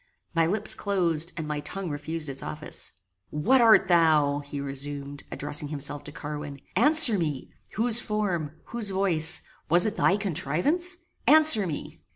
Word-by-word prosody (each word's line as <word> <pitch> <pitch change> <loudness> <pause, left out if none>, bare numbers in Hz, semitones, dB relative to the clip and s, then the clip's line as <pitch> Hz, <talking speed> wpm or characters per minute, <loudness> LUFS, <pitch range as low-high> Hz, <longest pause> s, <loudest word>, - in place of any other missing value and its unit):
My 165 -1 +2
lips 210 +4 +2
closed, 170 -5 -2
and 160 -2 -5
my 150 -1 -3
tongue 175 +4 -6
refused 155 +2 -5
its 135 -1 -6
office. 155 0 -8 0.4
"What 235 - +2
art 220 -4 +5
thou?" 155 -5 +3
he 145 0 -8
resumed, 140 +1 -6
addressing 145 +1 -1
himself 145 0 -5
to 150 - -7
Carwin. 145 -1 -8 0.2
"Answer 295 -9 +6
me; 150 -5 -4 0.2
whose 235 +1 +4
form 185 -8 -3 0.2
whose 235 -4 -1
voice 175 -4 0 0.3
was 175 +2 +5
it 215 - -3
thy 190 - +2
contrivance? 200 - -1 0.3
Answer 305 -10 +6
me." 155 - -7
165 Hz, 150 wpm, -25 LUFS, 145-205 Hz, 0.4 s, Answer